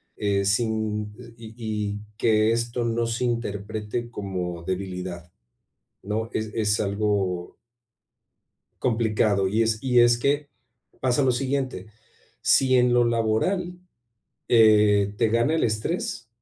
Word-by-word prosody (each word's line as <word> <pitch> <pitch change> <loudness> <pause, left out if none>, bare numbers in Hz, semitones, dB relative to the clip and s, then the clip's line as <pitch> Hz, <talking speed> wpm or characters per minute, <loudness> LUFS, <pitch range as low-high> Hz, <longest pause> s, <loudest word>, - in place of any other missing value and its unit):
eh, 100 -1 0
sin 105 0 -1 0.2
y 115 -1 -10
y 110 - -12
y 105 -2 -3 0.2
que 110 -1 +3
esto 120 +1 -1
no 115 0 0
se 115 +2 -2
interprete 110 0 -3
como 90 -6 -5
debilidad, 90 -2 -5 0.7
¿no? 110 +3 -3
Es 110 0 -3
es 105 -2 +1
algo 100 -3 -1 1.3
complicado, 110 -4 +1
y 110 +4 +1
es 110 -1 0
y 125 -2 +4
es 120 0 +5
que 145 +3 0 0.5
pasa 130 +2 +2
lo 130 -2 +3
siguiente, 130 -5 -2 0.6
si 130 -1 +4
en 125 0 +4
lo 120 0 +4
laboral, 120 - 0 0.7
eh, 105 -3 +5
te 115 +1 +2
gana 115 +7 +2
el 160 - +1
estrés, 115 +1 -2
110 Hz, 125 wpm, -24 LUFS, 105-120 Hz, 1.3 s, es